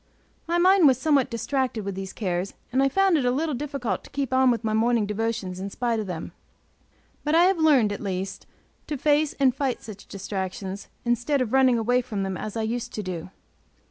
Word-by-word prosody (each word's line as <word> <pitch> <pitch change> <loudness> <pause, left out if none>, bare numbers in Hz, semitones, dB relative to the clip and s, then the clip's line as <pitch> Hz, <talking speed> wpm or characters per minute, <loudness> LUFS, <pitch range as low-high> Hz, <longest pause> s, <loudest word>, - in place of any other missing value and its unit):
My 340 +1 +1
mind 365 -1 +6
was 260 -3 +4
somewhat 280 -2 +2
distracted 235 -1 -2
with 200 - -3
these 190 0 -6
cares, 185 -2 -3 0.2
and 260 +2 +2
I 275 - +3
found 385 +2 +3
it - - -1
a 245 - +2
little 300 +5 0
difficult 275 -2 -3
to - - -14
keep 275 -2 -3
on 260 0 +5
with 235 -1 0
my 215 -1 0
morning 225 0 +2
devotions 210 -3 -2
in 195 +1 -4
spite 235 +1 -1
of 210 - -4
them. 175 -2 -5 0.9
But 300 +1 +1
I 335 - +6
have 370 -1 +3
learned, 270 -10 +4
at - - -6
least, 190 -1 -4 0.4
to 300 - -3
face 295 +2 +2
and 265 -3 +3
fight 270 -1 -2
such 205 -3 -10
distractions, 195 0 -5 0.2
instead 240 +4 +1
of 250 -2 -1
running 260 -2 +5
away 245 +3 +2
from 215 -5 -4
them 190 -1 -3
as 215 +4 -5
I 225 - -1
used 240 +2 -3
to 210 - -4
do. 180 -2 -5
240 Hz, 210 wpm, -25 LUFS, 205-275 Hz, 0.9 s, mind